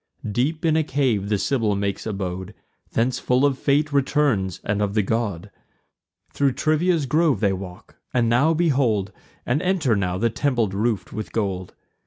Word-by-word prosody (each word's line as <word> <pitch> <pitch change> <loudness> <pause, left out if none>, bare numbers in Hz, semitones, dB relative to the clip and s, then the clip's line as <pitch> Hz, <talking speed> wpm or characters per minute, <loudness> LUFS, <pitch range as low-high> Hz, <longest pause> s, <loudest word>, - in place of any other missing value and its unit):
Deep 150 - -1
in 160 -1 +3
a 160 - +3
cave 130 -9 0
the 105 - +2
Sibyl 110 -3 0
makes 100 +2 -2
abode; 95 -1 -4 0.4
Thence 120 +2 +1
full 125 +2 +2
of 140 -2 +2
fate 145 +1 +1
returns, 135 - +1
and 100 0 -1
of 100 0 -1
the 105 - +3
god. 105 -3 -2 0.8
Thro' 140 -1 +2
Trivia's 155 +3 +1
grove 150 - +2
they 100 -1 +2
walk; 90 -2 -9
and 120 -2 +2
now 135 +8 +3
behold, 130 - +1 0.3
And 130 +6 0
enter 180 - +1
now, 90 -3 -1
the 115 +3 +1
temple 120 -3 0
roof'd 100 0 -1
with 110 0 -6
gold. 95 -4 -3
115 Hz, 165 wpm, -23 LUFS, 100-145 Hz, 0.8 s, in